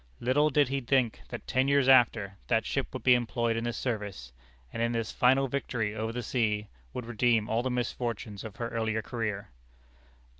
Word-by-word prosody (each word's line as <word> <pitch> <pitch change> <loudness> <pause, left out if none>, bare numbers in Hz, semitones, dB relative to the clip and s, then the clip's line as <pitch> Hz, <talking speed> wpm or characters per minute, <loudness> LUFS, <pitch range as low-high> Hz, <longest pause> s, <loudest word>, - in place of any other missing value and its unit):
Little 145 +5 +3
did 145 -2 +3
he 135 0 -1
think 125 -2 +1
that - - -7
ten 130 +1 +1
years 140 -1 +3
after, 115 -7 +4
that 115 -2 +2
ship 135 - -1
would 130 -4 -6
be 130 - +6
employed 120 -1 0
in 115 +1 -2
this 120 - -2
service; 105 - -4 0.4
and - - -3
in 115 +1 +1
this 115 -2 -2
final 130 +2 +3
victory 120 -5 -2
over 110 +1 -3
the 120 +1 -4
sea, 105 -3 0 0.2
would 125 - -5
redeem 115 -1 +2
all 115 +2 +1
the 130 - -2
misfortunes 120 -4 -3
of 110 -3 -8
her 115 -1 -4
earlier 110 -1 -1
career. 105 - -4
115 Hz, 190 wpm, -29 LUFS, 110-130 Hz, 0.4 s, be